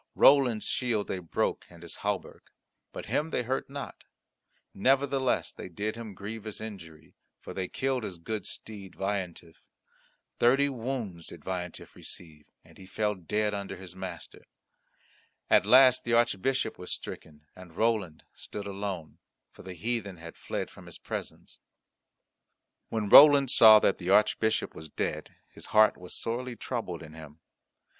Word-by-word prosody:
Roland's 130 -6 +5
shield 115 -5 -1
they 95 - -3
broke 85 -3 -2
and 85 -1 -15
his 85 - -8
hauberk; 100 -2 -4 0.4
but - - -7
him 155 +2 -1
they 125 - -1
hurt 130 +3 -2
not; 140 0 -8 0.7
nevertheless 135 +3 +1
they - - -9
did 105 +5 -3
him 115 -1 -7
a - - -10
grievous 110 +2 -7
injury, 85 -8 -10 0.3
for - - -9
they 95 -1 -3
killed 130 +2 -1
his 95 -4 -5
good 100 +3 -5
steed 100 -4 -8
Veillantif. 95 -4 -4 0.8
Thirty 135 +4 +4
wounds 115 -9 -5
did 85 - -10
Veillantif 90 -2 -5
receive, 75 -4 -9 0.2
and - - -18
he 95 - -12
fell 105 +2 -1
dead 105 +3 -1
under 100 -1 -5
his 90 -1 -10
master. 95 -3 -8 1.1
At 95 - +5
last 130 +2 +7
the 120 - -1
Archbishop 120 +2 +1
was 90 - -7
stricken 75 -1 -7
and 90 -2 -14
Roland 110 -8 0
stood 105 - -8
alone, 100 -5 -5 0.3
for - - -15
the 95 -1 -9
heathen 100 0 -3
had 85 0 -10
fled - - -5
from - - -14
his - - -8
presence. - - -7 1.3
When 110 -2 -2
Roland 140 +2 +9
saw 110 -1 +9
that - - +2
the 90 -1 -4
Archbishop 105 +2 +2
was 80 0 -10
dead, - - -4 0.2
his - - -8
heart 110 0 +5
was 90 0 -5
sorely 120 +2 -3
troubled 110 -10 -5
in 80 0 -12
him. 80 -1 -12
105 Hz, 150 wpm, -29 LUFS, 90-120 Hz, 1.3 s, Roland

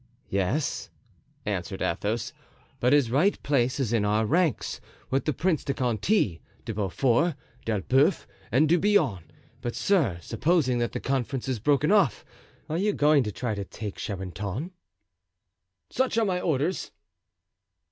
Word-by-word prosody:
"Yes," 100 +10 -1 0.6
answered - - -3
Athos, 110 +2 -2 0.5
"but 125 - +2
his 140 -5 +4
right 170 +11 +3
place 130 -1 +1
is 120 -4 0
in 115 -3 +2
our 105 +2 +2
ranks, 165 +3 0 0.3
with 135 +1 +1
the 155 - +2
Prince 160 +3 0
de 140 - -2
Conti, 120 - +1 0.2
De 115 - -3
Beaufort, 120 - +1 0.3
D'Elbeuf, 130 - +2 0.3
and 140 +7 +4
De 170 +3 +4
Bouillon; 155 - +2 0.4
but, 120 - -3
sir, 155 - +2
supposing 130 - +1
that 120 - -1
the - - -2
conference 135 -1 -2
is 130 -4 -1
broken 145 - +2
off—are 165 - -1
you 205 +2 +1
going 150 -1 +4
to 105 -4 -2
try 120 +2 -3
to 100 -1 -3
take 105 0 -7
Charenton?" 100 - -4 1.2
"Such 260 -3 0
are 225 - +3
my 180 -2 0
orders." 160 +3 0
130 Hz, 140 wpm, -27 LUFS, 110-160 Hz, 1.2 s, his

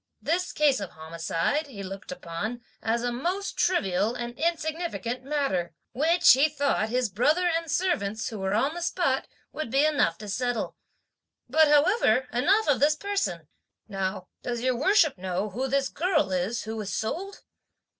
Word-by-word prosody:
This 360 +3 -1
case 290 -4 +3
of 200 -3 -5
homicide, 165 - -2
(he 210 -8 -8
looked 195 +1 -8
upon) 180 +7 -5 0.2
as 230 +1 0
a 245 - 0
most 355 +11 -2
trivial 210 - +1
and 240 -1 -4
insignificant 315 -6 -2
matter, 260 - -1 0.2
which, 330 +6 +5
(he 275 +5 +4
thought), 285 -7 0
his 250 +1 +1
brother 295 - +2
and 330 -1 -1
servants, 265 - 0
who 220 -4 -7
were 190 +1 -1
on 270 +7 +1
the 345 - -6
spot, 335 -6 0 0.3
would 310 -6 -4
be 275 +5 +3
enough 285 - +2
to 210 - -9
settle. 245 +3 -2 0.7
But, 310 +5 +5
however, 295 - +3
enough 390 - +3
of 275 -5 +3
this 295 +3 +4
person. 305 - -2 0.4
Now 190 -2 -3
does 240 -1 -3
your 255 0 +1
worship 315 - +3
know 190 +3 -2
who 255 +7 -2
this 275 +1 +1
girl 320 - 0
is 185 +6 -1
who 220 +1 -5
was 210 -2 -4
sold?" 375 - -4
255 Hz, 165 wpm, -27 LUFS, 205-310 Hz, 0.7 s, which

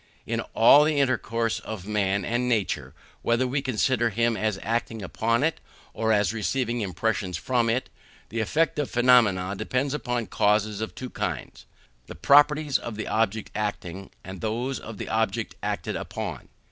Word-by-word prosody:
In - - -1
all 140 +6 +8
the 150 -1 +1
intercourse 115 -4 0
of 105 -4 -7
man 100 -2 0
with 120 +5 0
nature, 115 -6 -1 0.3
whether 115 +2 +2
we 135 +2 -1
consider 125 -1 +1
him 115 +2 +1
as 110 -2 -1
acting 115 -1 -2
upon 115 +5 0
it, 160 +1 0 0.3
or 110 0 0
as 105 -2 +2
receiving 120 +2 -1
impressions 95 -1 -1
from 120 +5 +1
it, 125 +3 0 0.4
the 115 - -3
effect 155 +8 +1
or 145 - 0
phenomenon 110 -7 +3
depends 135 +6 -1
upon 125 -5 -2
causes 105 0 +1
of 110 - -4
two 130 -1 -7
kinds: - - -5 0.4
the - - -9
properties 145 0 +4
of 115 - -6
the 110 - -5
object 110 -1 0
acting, 95 -3 -4
and 95 -1 -8
those 120 +5 -2
of 110 -1 -9
the - - -5
object 110 -2 -1
acted - - -3
upon. - - -5
115 Hz, 160 wpm, -26 LUFS, 105-125 Hz, 0.4 s, all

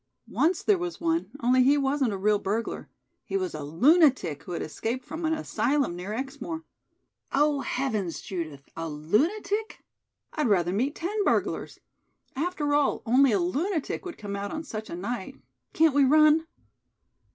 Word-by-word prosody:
"Once 340 +3 +1
there 405 -3 +3
was 350 0 -4
one, 330 0 0
only 250 +2 +4
he 275 +3 +5
wasn't 275 -3 +1
a 200 - -3
real 205 +2 +2
burglar. 215 +4 -3 0.3
He 390 - -2
was 370 -4 -2
a 150 - -5
lunatic 245 - +3
who 180 - -7
had - - -3
escaped 235 +10 -4
from 320 +2 -5
an 320 - +2
asylum 280 - 0
near 180 +3 -6
Exmoor." 275 +6 -5 0.7
"Oh, 295 0 +2
heavens, 220 -10 -2
Judith, 155 -7 -6
a 165 0 -4
lunatic? 330 - -1 0.5
I'd 300 -4 0
rather 180 -4 +2
meet 260 +9 0
ten 410 +5 -2
burglars. - - 0 0.6
After 300 -1 -1
all, 290 -1 +2
only 255 +3 +5
a 205 - +2
lunatic 300 - -1
would 360 -3 -7
come 200 -2 -5
out 200 0 -4
on 315 0 -4
such 220 -6 -6
a - - -5
night. 230 +6 -4 0.4
Can't 320 -2 +4
we 285 0 +5
run?" 305 +3 +5
270 Hz, 165 wpm, -27 LUFS, 200-320 Hz, 0.7 s, he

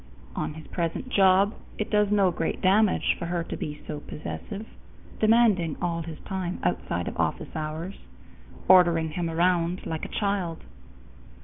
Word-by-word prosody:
On 150 - -3
his 160 - -10
present 170 +8 -3
job, 195 -1 +4 0.2
it 210 - -3
does 210 -1 +3
no 200 -3 +4
great 165 -1 -2
damage 200 +2 +3
for 170 - -3
her 170 -1 -1
to - - -5
be 150 0 -6
so 150 -1 -5
possessive, 200 +8 -7 0.5
demanding 215 -8 +4
all 170 -1 -1
his 160 -1 -7
time 185 -2 -3
outside - - -1
of - - -5
office - - -1
hours, 160 +4 -4 0.7
ordering 170 -4 +5
him 170 +1 -2
around 175 +1 +1
like 160 -1 -4
a - - -2
child. 195 -5 -1
175 Hz, 150 wpm, -26 LUFS, 165-200 Hz, 0.7 s, ordering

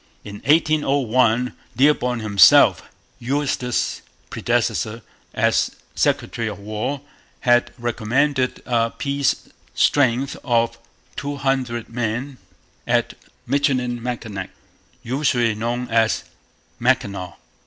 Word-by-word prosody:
In 100 0 -8
1801 135 -6 +2 0.2
Dearborn 125 -4 +2
himself, 100 -3 +6 0.4
Eustis's 130 -1 -1 0.3
predecessor 115 +2 -1 0.3
as - - +1 0.2
Secretary 115 -2 0
of 105 - -5
War, 110 +7 -4 0.4
had 120 -1 +3
recommended 125 +3 0
a 115 -2 +1
peace 140 +2 -1 0.3
strength 135 -1 +2
of 115 -1 +1 0.4
two 145 0 -4
hundred 130 -4 -1
men 120 +3 -3 0.5
at - - +1 0.3
Michilimackinac, 125 -6 -1 0.5
usually 125 -2 +1
known 120 +3 -3
as 115 -1 +2 0.6
'Mackinaw.' 100 -7 0
125 Hz, 85 wpm, -21 LUFS, 115-135 Hz, 0.6 s, himself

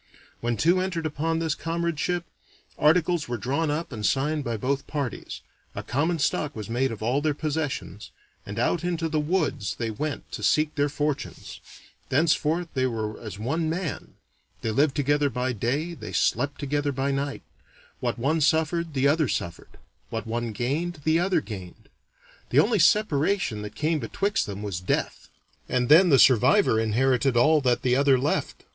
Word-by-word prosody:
When 120 -1 -1
two 170 - +3
entered 180 -3 -2
upon 160 +2 -1
this 160 -2 0
comradeship, 170 +1 -2 0.5
articles 165 +1 +2
were 120 0 -3
drawn 140 +8 -1
up 150 +2 -2
and 110 -4 -6
signed 145 +6 +1
by 115 -3 -2
both 135 +5 -2
parties, 140 -5 -4 0.3
a - - -4
common 160 +7 0
stock 150 0 -1
was 110 0 -6
made 130 +2 +1
of 110 -1 -6
all 125 +5 +1
their 150 -1 0
possessions, 145 - -3 0.3
and - - -8
out 90 - +1
into 170 -2 -1
the 155 -1 0
woods 155 - -1
they 115 -2 -3
went 150 +8 -5
to - - -6
seek 155 0 +2
their 145 0 +1
fortunes; 150 0 -4 0.5
thenceforth 160 +3 +1
they 130 -1 +1
were 110 -3 -4
as 105 -4 -7
one 155 +9 -1
man; 165 -2 -4 0.5
they 110 - 0
lived 140 +5 +2
together 145 0 +2
by 125 +1 -2
day, 140 - -1
they 110 - -8
slept 140 +4 0
together 145 0 -1
by 135 +1 -1
night; 140 +1 -3 0.6
what - - -2
one 150 +7 0
suffered, 160 +1 +1
the 135 +1 +3
other 155 0 +2
suffered; 85 -5 -5 0.3
what 115 - -4
one 115 +1 -3
gained, 145 - -2
the 160 +2 +3
other 180 -2 +1
gained. 95 -8 -9 0.6
The 125 - 0
only 210 +8 +4
separation 165 - +2
that 105 0 -8
came 155 +1 0
betwixt 200 +8 -1
them 100 0 -6
was 100 -4 -3
death, 90 - -2 0.4
and 125 -1 0
then 170 +5 +7
the 140 - +6
survivor 130 - +5
inherited 125 +3 +2
all 155 +5 +5
that 125 -3 +1
the 125 -1 +3
other 140 -1 +4
left. 140 +4 -2
145 Hz, 170 wpm, -25 LUFS, 120-160 Hz, 0.6 s, then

